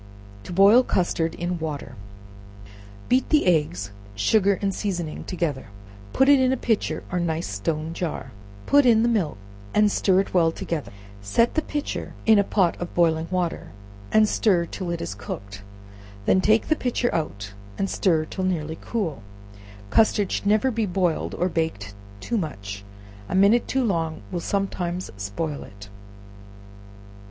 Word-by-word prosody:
To - - -8
Boil 200 +7 +7
Custard 170 -7 0
in 175 0 -3
Water. 150 -4 -5 1.1
Beat 255 +1 +2
the 305 -1 +3
eggs, 150 - +1 0.2
sugar 200 - +3
and 195 -1 -1
seasoning 175 -7 -3
together, 165 -7 -2
and 100 0 -18
put 265 - +4
it 285 -1 +7
in 260 0 +3
a 265 - +1
pitcher 225 -3 -1
or 180 - 0
nice 165 -1 -1
stone 155 +11 -3
jar; 170 -2 -4 0.3
put 285 0 +5
in 230 -3 +5
the - - +3
milk 200 - 0 0.4
and 210 0 +4
stir 190 -1 +3
it 195 - -7
well 165 -3 +4
together; 165 -2 -4 0.3
set 165 - +2
the 315 - +1
pitcher 295 -1 -4
in 220 -2 +6
a - - +4
pot 190 -3 +1
of 175 - -5
boiling 165 -1 +2
water, 180 -2 -2 0.4
and 215 0 +5
stir 190 -5 +2
till 180 +1 -6
it 170 -1 -3
is - - -4
cooked, 100 0 -8 0.6
when 185 - +4
take 220 +3 +3
the 310 - +4
pitcher 245 -3 -1
out 105 -11 -3 0.2
and 195 - 0
stir 165 -5 +1
till 190 +4 -5
nearly 160 -4 -2
cool. 175 - -3 0.7
Custard 210 - +3
should - - -2
never 215 +5 +3
be 225 -2 -1
boiled 180 -3 -1
or 180 - 0
baked 160 - -2 0.3
two 230 - -1
much 100 - -6 0.5
a - - -2
minute 200 +5 +4
too 265 0 0
long 165 -7 -1
will 175 - -2
sometimes 185 -2 -2
spoil 105 +10 -4
it. 100 0 -12
175 Hz, 160 wpm, -24 LUFS, 155-210 Hz, 1.1 s, Boil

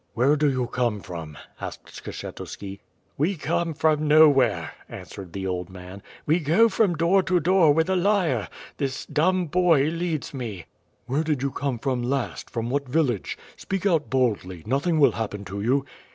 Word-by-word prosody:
"Where 130 +5 +4
did 145 -2 +2
you 130 -1 0
come 120 -4 -1
from?'^ 80 -6 -8 0.3
asked - - -6 0.2
Skshetuski. 100 -1 -7 0.4
"We 170 +7 +1
come 165 0 -1
from 155 0 +2
nowhere," 135 - +5 0.2
answered 95 -3 -9
the 95 +1 -5
old 90 -1 -3
man. 95 +1 -10 0.3
"Wc 160 +3 +2
go 175 +11 +4
from 195 -3 +2
door 170 +4 +3
to 185 -1 +1
door 175 -1 +4
with 160 +2 +2
a 190 - +1
lyre. 175 - +1 0.3
This 135 -2 -3
dumb 180 +4 +1
boy 165 -3 +3
leads 165 -3 -3
me." 115 -10 -6 0.4
"Where 135 +6 0
did 150 -4 -1
you 140 - 0
come 140 -3 -2
from 130 0 -1
last, 130 +1 -2
from 115 0 -3
what 140 -1 -1
village? 130 - 0 0.2
Speak 195 0 -4
out 165 -6 +2
boldly, 105 -10 0
nothing 140 +7 +1
will 140 -4 +6
happen 105 -2 -4
to 100 +1 -5
you." 135 +5 +1
140 Hz, 170 wpm, -25 LUFS, 115-165 Hz, 0.4 s, will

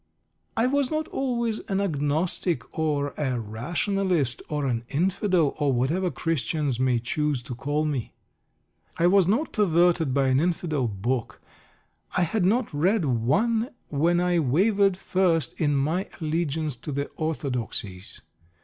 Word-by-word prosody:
I 225 - +3
was 275 0 +1
not 310 0 -1
always 235 -4 -1
an 195 0 +1
Agnostic, 160 - -1
or 145 -2 0
a 130 -5 0
Rationalist, 150 - -1
or 150 -2 -1
an 120 -3 -1
"Infidel," 180 0 +1
or 145 -2 +2
whatever 150 +10 +1
Christians 150 -5 -1
may 130 -2 +2
choose 140 +2 -1
to 125 -1 -6
call 145 +5 -1
me. 140 -6 -3 0.8
I 170 - +2
was 185 0 +5
not 235 +11 +1
perverted 175 - +3
by 135 0 +2
an 130 +1 +3
Infidel 160 -5 0
book. 115 +4 -2 0.8
I 180 - +4
had 180 +3 0
not 220 0 +1
read 180 +5 +2
one 215 - +1 0.2
when 165 +4 +2
I 175 -1 +2
wavered 195 - +3
first 175 -8 0
in 145 -2 +2
my 160 +8 0
allegiance 155 -2 -1
to 150 - -6
the 140 +1 -1
orthodoxies. 120 - -3
155 Hz, 140 wpm, -26 LUFS, 135-185 Hz, 0.8 s, was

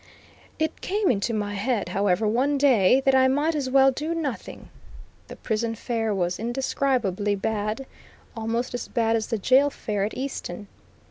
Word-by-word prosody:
It 315 0 -2
came 405 -4 +1
into 210 +1 -1
my 205 -2 -2
head, 210 +2 -1
however, 200 +1 +1
one 265 +7 +1
day, 260 -3 +4
that 270 - +4
I 260 0 +5
might 290 +5 +1
as 285 -4 -2
well 270 0 +5
do 305 +6 -3
nothing. 295 -7 -5 0.6
The - - -9
prison 225 0 -2
fare 225 -1 -2
was 180 -3 -1
indescribably 235 -4 0
bad, 215 +4 -2 0.5
almost 230 +2 -2
as 245 - -4
bad 230 -2 +1
as 220 -1 -1
the 230 - -1
jail 260 +7 +4
fare 210 -7 -3
at 210 - -3
Easton. 215 -7 -5
235 Hz, 160 wpm, -25 LUFS, 210-270 Hz, 0.6 s, I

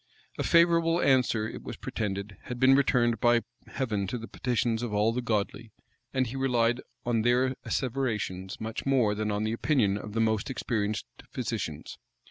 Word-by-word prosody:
A - - +1
favorable 170 0 +4
answer, 125 -6 +3
it - - -7
was - - -7
pretended, 100 -1 -4
had 125 -1 -5
been 130 +1 +6
returned 125 -4 +3
by 120 0 +4 0.2
Heaven 105 -7 -2
to 125 - -3
the 115 0 -8
petitions 120 -2 -1
of 120 -3 -3
all 105 +2 +2
the 125 - -1
godly: 110 -1 -2 0.4
and 130 -1 +1
he 120 +2 -6
relied 125 -2 +1 0.2
on 120 -2 +1
their 125 +3 +2
asseverations 110 -8 -2
much 110 0 -4
more 125 -6 +3
than 105 +1 -2
on 105 0 -1
the 110 +1 -1
opinion 115 -6 +1
of 105 - -8
the 115 - -1
most 110 +2 +1
experienced 110 -5 -2 0.2
physicians. 100 - -4
115 Hz, 170 wpm, -28 LUFS, 105-130 Hz, 0.4 s, been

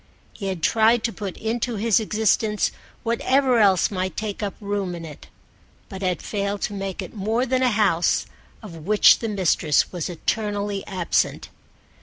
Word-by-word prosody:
He 200 - -6
had 185 -4 -4
tried 225 +3 +3
to 230 -2 -1
put 200 -4 -6
into 230 +2 -2
his 220 +1 +2
existence 215 0 +1 0.3
whatever 255 +2 +2
else 195 -3 +4
might 185 -1 -3
take 210 -1 -4
up 205 -2 -3
room 200 -3 -3
in 165 -1 -7
it, 150 -3 -11 0.6
but 190 - -8
had 185 -2 -1
failed 200 -1 -3
to 210 - -2
make 195 -2 -4
it - - -10
more 220 +4 0
than 260 0 0
a 255 - +4
house 200 -6 +2 0.4
of 175 -6 -9
which 210 0 +6
the 225 - -3
mistress 175 -7 +1
was 180 0 -4
eternally 205 +2 -2
absent. 185 -4 -1
205 Hz, 165 wpm, -23 LUFS, 190-220 Hz, 0.6 s, which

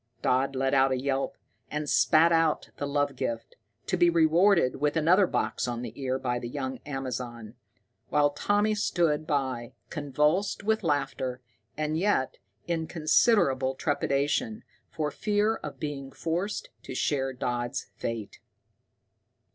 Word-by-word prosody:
Dodd 135 +2 +2
let 135 +1 0
out 135 0 +4
a 130 - 0
yelp, 135 0 -1 0.3
and 150 0 -3
spat 165 +3 +5
out 165 -2 +2
the 145 - -3
love 145 -1 0
gift, 115 -2 -4 0.3
to - - 0
be 175 -1 +5
rewarded 170 -1 +4
with 150 +3 0
another 180 +5 +5
box - - -1
on 120 0 -3
the 115 -3 -6
ear 130 -1 -1
by 125 -2 -2
the 120 -1 -6
young 130 -1 -4
Amazon, 125 -5 -5 0.6
while 145 0 +3
Tommy 205 +8 +1
stood 165 -7 +1
by, 130 -5 -1 0.2
convulsed 150 +8 0
with 220 +1 +1
laughter, 135 -4 -1 0.4
and 155 +1 -1
yet 190 -9 +1 0.3
in 165 -2 -2
considerable 155 - +3
trepidation, 140 -5 0 0.3
for 150 -2 -2
fear 210 +4 +1
of - - -8
being 140 -3 -5
forced 185 - -3
to - - -8
share 135 -2 0
Dodd's 125 +1 -3
fate. 115 -3 -5
145 Hz, 140 wpm, -28 LUFS, 130-165 Hz, 0.6 s, spat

